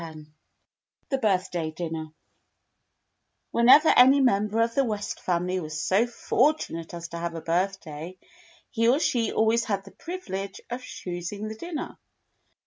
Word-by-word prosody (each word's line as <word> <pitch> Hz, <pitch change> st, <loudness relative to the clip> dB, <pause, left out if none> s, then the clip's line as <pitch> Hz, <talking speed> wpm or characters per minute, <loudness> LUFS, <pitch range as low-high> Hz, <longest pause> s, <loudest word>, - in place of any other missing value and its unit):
X 160 Hz, -1 st, -9 dB, 0.9 s
The 270 Hz, -3 st, 0 dB
Birthday 185 Hz, -6 st, 0 dB
Dinner 160 Hz, -1 st, -5 dB, 1.4 s
WHENEVER 260 Hz, +7 st, +6 dB
any 265 Hz, +3 st, +7 dB
member 215 Hz, -3 st, +2 dB
of 230 Hz, 0 st, -2 dB
the 275 Hz, -, +2 dB
West 210 Hz, -4 st, -3 dB
family 180 Hz, +1 st, -1 dB
was 155 Hz, -2 st, -5 dB
so 190 Hz, +8 st, +2 dB
fortunate 235 Hz, -, 0 dB
as 170 Hz, 0 st, -6 dB
to 170 Hz, -, -6 dB
have 170 Hz, 0 st, -4 dB
a 165 Hz, -, -5 dB
birthday, 175 Hz, -1 st, -3 dB, 0.5 s
he 230 Hz, -2 st, +1 dB
or 260 Hz, -, +4 dB
she 235 Hz, -7 st, +1 dB
always 225 Hz, +1 st, +2 dB
had 200 Hz, -3 st, -2 dB
the 195 Hz, -, -12 dB
privilege 200 Hz, -, -6 dB
of 245 Hz, +1 st, -3 dB
choosing 185 Hz, 0 st, -6 dB
the 220 Hz, -, -6 dB
dinner. 335 Hz, +6 st, -6 dB
200 Hz, 140 wpm, -26 LUFS, 170-235 Hz, 1.4 s, any